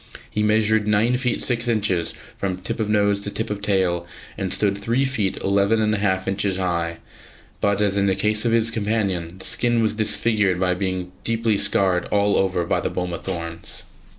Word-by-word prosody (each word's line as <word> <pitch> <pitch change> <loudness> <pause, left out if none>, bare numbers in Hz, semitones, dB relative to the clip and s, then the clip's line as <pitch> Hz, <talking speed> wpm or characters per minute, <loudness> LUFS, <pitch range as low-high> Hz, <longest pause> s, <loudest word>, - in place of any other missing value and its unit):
He 105 - -1
measured 105 0 +2
nine 110 +4 +3
feet 125 -1 0
six 120 -1 +1
inches 100 -7 0 0.2
from 95 -2 -2
tip 90 - -5
of 110 -1 -1
nose 100 -1 +2
to 100 - -2
tip 110 +1 -4
of 105 -1 -4
tail, 90 -4 +1 0.3
and 95 -2 -3
stood 100 -2 +2
three 115 +6 0
feet 105 -8 -1
eleven 100 +3 +2
and 110 0 +2
a 105 - 0
half 95 -2 0
inches 95 -1 +1
high; 85 -3 -1 0.6
but, 100 -1 +1
as 100 -1 +2
in 100 0 +2
the 95 - +2
case 105 +2 +1
of 120 - +1
his 115 0 +2
companion, 100 -6 -1
the - - -5
skin 120 -1 +2
was 110 - +1
disfigured 110 -3 +1
by 90 -1 +2
being 90 -1 -3
deeply 115 -1 +1
scored 95 -2 +1
all 100 0 +2
over 95 -3 +1
by - - +1
the - - -1
boma 90 -1 -3
thorns. 85 -3 -5
100 Hz, 195 wpm, -22 LUFS, 95-110 Hz, 0.6 s, nine